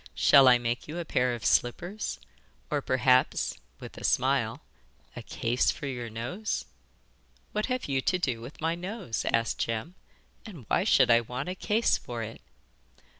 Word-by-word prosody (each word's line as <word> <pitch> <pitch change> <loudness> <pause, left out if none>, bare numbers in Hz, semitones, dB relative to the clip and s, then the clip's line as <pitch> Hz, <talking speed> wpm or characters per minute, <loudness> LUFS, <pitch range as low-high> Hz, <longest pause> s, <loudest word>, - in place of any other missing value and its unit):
Shall 135 -1 +6
I 125 -1 +7
make 120 0 -3
you 155 +3 -6
a 170 - -4
pair 125 -4 +1
of 115 - -8
slippers, 175 - 0 0.5
or 145 -1 +1
perhaps' 130 0 +2 0.3
with - - -10
a - - -11
smile - - +1 0.5
'a - - -6
case 120 +2 0
for - - -3
your 125 -4 -4
nose?' 120 - -4 0.9
'What 210 0 -1
have 255 0 -2
you 135 -2 0
to 180 - +1
do 125 -10 -2
with 120 +5 -10
my 165 +1 +1
nose?' 180 - -4
asked 115 0 0
Jem. 115 +9 -2 0.5
'And 170 - -11
why - - +1
should - - +5
I 115 0 +6
want 125 +7 -5
a - - -2
case 210 +4 +1
for 120 -2 -5
it? 110 +1 -8
130 Hz, 170 wpm, -28 LUFS, 120-175 Hz, 0.9 s, I